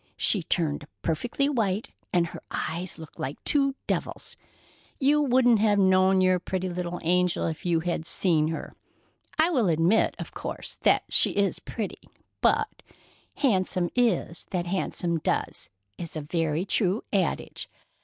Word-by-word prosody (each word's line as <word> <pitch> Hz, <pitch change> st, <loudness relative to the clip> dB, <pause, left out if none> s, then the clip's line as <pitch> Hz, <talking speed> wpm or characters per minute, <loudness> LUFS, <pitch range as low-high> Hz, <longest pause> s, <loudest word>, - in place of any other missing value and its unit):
She 200 Hz, -, +3 dB
turned 155 Hz, -4 st, -1 dB, 0.2 s
perfectly 235 Hz, -, 0 dB
white, 220 Hz, -7 st, -1 dB, 0.2 s
and 175 Hz, -1 st, +3 dB
her 165 Hz, -, -8 dB
eyes 170 Hz, +3 st, -3 dB
looked 160 Hz, -2 st, -12 dB
like 135 Hz, +3 st, -3 dB
two 275 Hz, -2 st, +3 dB
devils. -, -, -3 dB, 0.6 s
You 290 Hz, +2 st, +4 dB
wouldn't 245 Hz, -4 st, +4 dB
have 210 Hz, -1 st, +3 dB
known 190 Hz, 0 st, +4 dB
your 185 Hz, -1 st, +3 dB
pretty 185 Hz, +1 st, -3 dB
little 175 Hz, 0 st, -4 dB
angel 180 Hz, +1 st, +2 dB
if 160 Hz, +2 st, -4 dB
you 165 Hz, -2 st, +2 dB
had 170 Hz, -1 st, -2 dB
seen 160 Hz, -5 st, +3 dB
her. 160 Hz, -, -5 dB, 0.6 s
I 320 Hz, +3 st, +4 dB
will 245 Hz, -, +2 dB
admit, 170 Hz, +7 st, +3 dB
of -, -, -7 dB
course, -, -, -6 dB
that -, -, +4 dB
she -, -, +3 dB
is 200 Hz, -2 st, +1 dB
pretty, 215 Hz, -4 st, -5 dB, 0.4 s
but -, -, +1 dB, 0.5 s
'handsome 185 Hz, -, +1 dB
is 220 Hz, -8 st, +1 dB
that 175 Hz, -2 st, -2 dB
handsome 175 Hz, -2 st, -1 dB
does' -, -, -2 dB, 0.3 s
is 170 Hz, -2 st, -7 dB
a 155 Hz, -, -3 dB
very 160 Hz, +2 st, -1 dB
true 200 Hz, +1 st, +1 dB
adage. 190 Hz, -5 st, -1 dB
185 Hz, 145 wpm, -27 LUFS, 170-215 Hz, 0.6 s, You